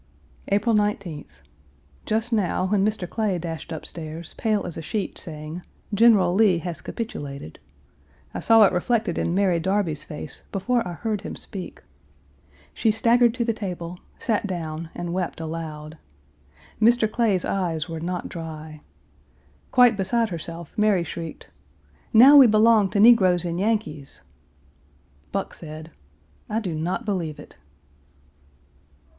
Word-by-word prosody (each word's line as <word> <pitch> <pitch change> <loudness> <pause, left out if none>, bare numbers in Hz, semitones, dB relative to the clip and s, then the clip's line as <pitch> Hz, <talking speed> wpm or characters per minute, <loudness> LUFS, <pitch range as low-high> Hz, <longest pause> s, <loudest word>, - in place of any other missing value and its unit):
April 205 +3 +2
19th. 200 - -2 0.7
Just 225 +2 0
now, 185 -3 +1
when 195 0 +2
Mr. 210 -3 -1
Clay 210 -2 -1
dashed 165 -1 -6
up 160 - -6
stairs, 160 0 -7
pale 215 -3 0
as 175 - -6
a - - -5
sheet, 200 +5 -4
saying, 155 0 -5 0.3
"General 200 -5 +5
Lee 195 -3 +4
has 170 0 -5
capitulated," 140 - -6 0.7
I - - -4
saw 225 -1 +6
it 195 - +4
reflected 215 0 0
in 170 - 0
Mary 190 -3 +2
Darby's 190 -3 -1
face 150 - -8
before 235 +5 0
I 175 - -5
heard 215 +2 -3
him - - -6
speak. 190 -3 -8 0.9
She 225 - +1
staggered 235 +2 +3
to 240 -2 -1
the 230 - +1
table, 180 -4 -6 0.2
sat 215 -3 -1
down, 165 -3 -5
and 175 0 -4
wept 180 -2 -3
aloud. 160 -1 -6 0.8
Mr. 230 0 +5
Clay's 215 -5 +1
eyes 175 -5 -1
were 165 -1 -5
not 175 +2 -3
dry. 155 -2 -8 0.9
Quite 245 -4 +5
beside 225 +4 +1
herself 170 -1 -7
Mary 210 -4 +3
shrieked, 165 0 -7 0.6
"Now 265 +6 +9
we 270 -3 +9
belong 215 -2 +4
to 205 - -1
negroes 190 -6 +6
and 170 0 -2
Yankees!" 205 -9 -2 1.1
Buck 195 0 -3
said, 155 0 -9 0.6
"I 220 - 0
do 190 -7 -4
not 175 +9 -2
believe 175 -7 -2
it." - - -13
185 Hz, 140 wpm, -24 LUFS, 165-220 Hz, 1.1 s, Now